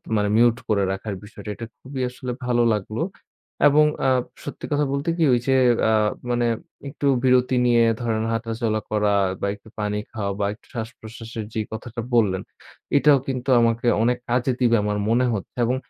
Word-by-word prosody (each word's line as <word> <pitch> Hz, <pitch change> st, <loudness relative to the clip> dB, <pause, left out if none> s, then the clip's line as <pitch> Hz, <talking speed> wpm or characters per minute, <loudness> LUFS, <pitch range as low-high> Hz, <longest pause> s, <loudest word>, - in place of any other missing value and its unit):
মানে 105 Hz, -1 st, +1 dB
মিউট 120 Hz, 0 st, +4 dB
করে 100 Hz, -2 st, +2 dB
রাখার 100 Hz, +1 st, -4 dB
বিষয়টা, 105 Hz, 0 st, -10 dB
এটা 115 Hz, -, -6 dB
খুবই 135 Hz, 0 st, -6 dB
আসলে 125 Hz, 0 st, -6 dB
ভালো 120 Hz, -1 st, +2 dB
লাগলো 105 Hz, +2 st, -3 dB, 0.7 s
এবং 150 Hz, +1 st, +5 dB, 0.2 s
আ -, -, +4 dB, 0.3 s
সত্যি 145 Hz, -, -7 dB
কথা 145 Hz, 0 st, +2 dB
বলতে 140 Hz, +4 st, -1 dB
কি 165 Hz, -, +2 dB
ওই 120 Hz, -, +3 dB
যে, 135 Hz, -, +4 dB, 0.4 s
আ -, -, +3 dB, 0.4 s
মানে 120 Hz, 0 st, +1 dB, 0.4 s
একটু 140 Hz, 0 st, -2 dB, 0.2 s
বিরতি 125 Hz, 0 st, +3 dB
নিয়ে 120 Hz, -1 st, +4 dB, 0.2 s
ধরেন 110 Hz, -2 st, -1 dB
হাঁটাচলা 115 Hz, -1 st, -1 dB
করা 105 Hz, -1 st, +2 dB, 0.3 s
বা 100 Hz, -, 0 dB
একটু 105 Hz, +2 st, -18 dB
পানি 105 Hz, 0 st, -1 dB
খাওয়া 100 Hz, -3 st, -3 dB
বা 100 Hz, -, +1 dB
একটু 105 Hz, -, -20 dB
শ্বাসপ্রশ্বাসের 115 Hz, -1 st, -7 dB
যেই 110 Hz, -1 st, -2 dB
কথাটা 115 Hz, +1 st, -6 dB
বললেন 100 Hz, -6 st, +3 dB, 0.6 s
এটাও 145 Hz, -1 st, +5 dB
কিন্তু 130 Hz, 0 st, -3 dB
আমাকে 115 Hz, +1 st, +1 dB, 0.2 s
অনেক 125 Hz, +1 st, +2 dB
কাজে 125 Hz, +2 st, +1 dB
দিবে 120 Hz, -2 st, +4 dB
আমার 105 Hz, 0 st, -1 dB
মনে 125 Hz, +2 st, +3 dB
হচ্ছে 100 Hz, -, -7 dB
এবং 125 Hz, +2 st, +1 dB
115 Hz, 175 wpm, -23 LUFS, 110-125 Hz, 0.7 s, এবং